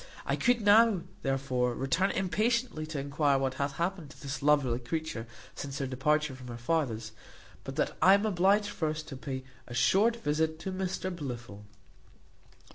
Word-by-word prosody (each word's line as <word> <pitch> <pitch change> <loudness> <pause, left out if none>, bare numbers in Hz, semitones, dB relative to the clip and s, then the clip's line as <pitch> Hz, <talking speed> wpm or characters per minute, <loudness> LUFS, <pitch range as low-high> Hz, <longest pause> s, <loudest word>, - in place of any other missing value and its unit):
I - - +1
could 245 -1 +2
now, 210 -1 +6 0.2
therefore, 130 -3 0
return 165 +9 +1
impatiently 215 -2 0
to 160 -1 -5
enquire 140 0 +1
what 135 -1 0
hath 140 0 -1
happened 170 0 -2
to 150 - -14
this 140 -2 -5
lovely 140 -4 +3
creature 130 -3 -4 0.3
since 140 -1 -6
her 135 - -1
departure 150 +3 +1
from 130 -1 -10
her 120 -1 -6
father's, 120 -5 -1 0.5
but - - -6
that - - 0
I 190 +4 +8
am 200 +2 0
obliged 200 +1 +3
first 155 -4 -3
to 135 - -6
pay 130 0 -5 0.2
a 120 - -7
short 200 - +4
visit 160 -4 0
to 190 - -4
Mr 185 0 -3
Blifil. 120 -9 -7
150 Hz, 165 wpm, -30 LUFS, 130-185 Hz, 0.5 s, I